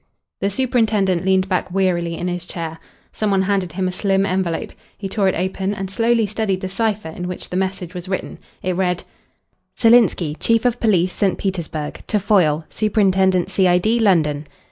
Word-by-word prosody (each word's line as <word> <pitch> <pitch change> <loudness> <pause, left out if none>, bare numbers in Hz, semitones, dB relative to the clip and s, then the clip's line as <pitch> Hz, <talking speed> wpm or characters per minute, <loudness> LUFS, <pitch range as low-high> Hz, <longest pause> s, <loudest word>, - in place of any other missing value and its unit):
The 200 - 0
superintendent 210 -6 +1
leaned 190 0 +3
back 185 -1 -1
wearily 175 -3 0
in 175 - -3
his 180 0 -4
chair. 165 -1 -5 0.3
Some 215 - -1
one 195 -1 +2
handed 190 -4 0
him 185 +1 -1
a - - -1
slim 195 +1 +1
envelope. 185 -3 -1 0.3
He 200 - -5
tore 195 0 0
it 190 - +1
open 190 +2 -2
and 195 -1 -5
slowly 230 +2 +2
studied 200 -2 -2
the 190 - -3
cipher 210 -3 -1
in 180 +2 -6
which 180 - -7
the - - -3
message 190 -2 -2
was 180 +1 -7
written. 190 - -4 0.2
It 185 -1 -1
read 180 -1 0 0.7
"Silinsky, 225 -10 +4
Chief 230 +1 +2
of 245 -1 +1
Police, 185 -5 +2
St. 195 -2 0
Petersburg. 165 -6 -4
To 210 - +1
Foyle, 170 -6 +2
Superintendent 190 -3 +2
C.I.D., 190 +4 +3
London. 155 -8 +2
190 Hz, 175 wpm, -20 LUFS, 180-205 Hz, 0.7 s, Silinsky